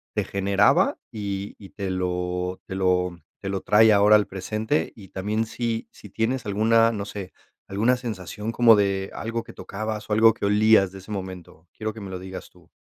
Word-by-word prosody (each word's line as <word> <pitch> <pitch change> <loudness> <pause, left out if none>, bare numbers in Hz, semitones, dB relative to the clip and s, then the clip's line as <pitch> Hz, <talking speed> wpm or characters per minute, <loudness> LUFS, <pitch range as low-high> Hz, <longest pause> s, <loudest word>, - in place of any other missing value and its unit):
te - - +1
generaba 100 +1 +2
y 100 -2 -4
y 100 - -13
te 100 -2 -5
lo 90 0 -2
te 95 - -5
lo 90 -2 +1 0.2
te 95 - -5
lo 95 -1 -2
trae 110 +1 +5
ahora 105 +1 +6
al 105 -1 +3
presente?, 95 -2 -2
y 100 -4 -13
también, 105 +4 -2
¿si 115 0 -3
si 105 - -14
tienes 120 +4 -1
alguna, 115 +3 +3
no 100 -3 -4
sé, 100 -3 -7 0.3
alguna 110 +6 +2
sensación 110 -2 -5
como 115 -1 +6
de 100 -1 0
algo 115 +1 -3
que - - -13
tocabas, 105 +1 -5
o 105 - -1
algo 110 +1 +6
que - - -3
olías 105 -1 +4
de 95 - -10
ese 95 - -15
momento?, 95 -4 -7
quiero 110 -1 -4
que - - -8
me 95 -1 -7
lo 95 - -5
digas 95 0 -9
tú. - - -22
100 Hz, 195 wpm, -24 LUFS, 95-110 Hz, 0.3 s, ahora